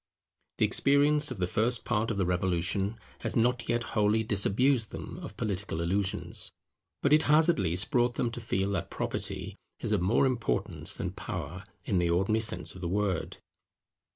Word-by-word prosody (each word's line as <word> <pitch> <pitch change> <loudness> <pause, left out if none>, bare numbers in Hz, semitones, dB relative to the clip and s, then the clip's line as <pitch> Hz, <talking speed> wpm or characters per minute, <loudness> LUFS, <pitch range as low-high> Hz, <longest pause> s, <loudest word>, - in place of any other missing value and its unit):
The - - +4
experience 145 +2 +3
of 130 - -5
the 90 - 0
first 110 +5 0
part 110 +2 0
of 110 - -2
the 95 - +1
Revolution 90 +4 0 0.2
has - - -3
not 120 +1 +1
yet 120 0 +1
wholly 105 +1 +3
disabused 110 +4 +2
them - - -7
of - - -8
political 100 -5 -2
illusions, 95 +4 -1 0.5
but 140 - +4
it 155 - +6
has 155 +3 +6
at 170 - +3
least 90 - -1
brought 120 -2 +2
them 120 - 0
to 120 0 -6
feel 100 -3 -1
that 95 -5 -2
Property - - -4 0.2
is - - -3
of 105 -4 +2
more 100 +9 +3
importance 125 -4 0
than - - -3
Power - - -6 0.2
in 90 - +1
the 85 -1 +1
ordinary 95 +6 +2
sense 110 - 0
of 95 - -11
the 90 - -2
word. 100 -2 -1
105 Hz, 180 wpm, -29 LUFS, 95-120 Hz, 0.5 s, it